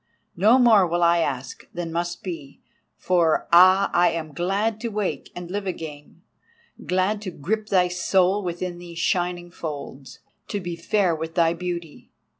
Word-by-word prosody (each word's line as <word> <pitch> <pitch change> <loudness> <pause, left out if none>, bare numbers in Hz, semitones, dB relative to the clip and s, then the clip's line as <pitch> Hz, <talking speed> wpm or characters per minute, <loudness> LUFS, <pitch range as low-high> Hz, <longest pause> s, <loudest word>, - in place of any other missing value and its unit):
No 215 +8 +5
more 225 -7 +5
will 175 +1 0
I 170 0 +4
ask 135 -5 -3
than 170 -1 -4
must 175 +1 -3
be, 165 -7 -7 0.4
for—ah!—I 175 +1 +4
am 160 -2 -5
glad 200 +7 -1
to 235 - -2
wake 210 -3 -3
and 175 0 -7
live 200 0 -3
again; 155 -5 -7 0.6
glad 185 +5 0
to 205 - -5
grip 210 +7 -3
thy 185 -3 +3
soul 185 +2 +2
within 175 -1 -4
these 170 -1 -10
shining 175 0 -1
folds, 145 -5 -7 0.3
to 205 - -3
be 175 -2 -5
fair 180 0 +1
with 160 +1 -6
thy 165 -2 +3
beauty! 170 -2 -6
175 Hz, 150 wpm, -24 LUFS, 170-190 Hz, 0.6 s, No